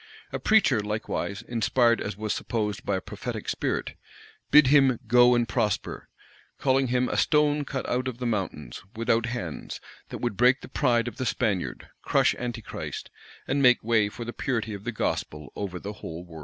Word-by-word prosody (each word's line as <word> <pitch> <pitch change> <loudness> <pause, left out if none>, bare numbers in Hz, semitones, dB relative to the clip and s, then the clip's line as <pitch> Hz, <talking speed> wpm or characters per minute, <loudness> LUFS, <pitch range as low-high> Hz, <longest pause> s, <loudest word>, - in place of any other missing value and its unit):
[] - - -26
A - - -2
preacher, 210 - +4
likewise, 105 0 -3
inspired 120 0 +2
as 100 -1 -4
was 105 0 -2
supposed 105 -3 -2
by 100 - 0
a 95 - -2
prophetic - - -6
spirit, - - -2 0.6
bid 150 -1 +8
him 135 -3 +4
"go 120 +2 +6
and 120 -1 +1
prosper;" 110 -5 -2 0.5
calling 135 -1 +2
him 125 +1 +1
"a - - -2
stone 150 -1 +3
cut 135 -1 -4
out 125 +1 -1
of 125 -3 -4
the 125 - -4
mountains 90 - -3
without 115 +1 +1
hands, 120 -10 -5 0.3
that - - -5
would 120 -4 -2
break 125 +2 +4
the - - -9
pride 120 -3 +1
of 120 - -6
the 130 - -2
Spaniard, 100 -5 -2
crush - - +3
Antichrist, 120 -3 -6 0.4
and 140 +1 +1
make 125 -2 +5
way 110 -2 +2
for 120 +3 -7
the 120 - -5
purity 115 -5 -2
of 100 0 -8
the 120 - -1
gospel 75 - -3
over 95 -3 -4
the 100 +3 -6
whole 85 -4 -8
world." 80 -2 -11
115 Hz, 185 wpm, -26 LUFS, 105-125 Hz, 0.6 s, bid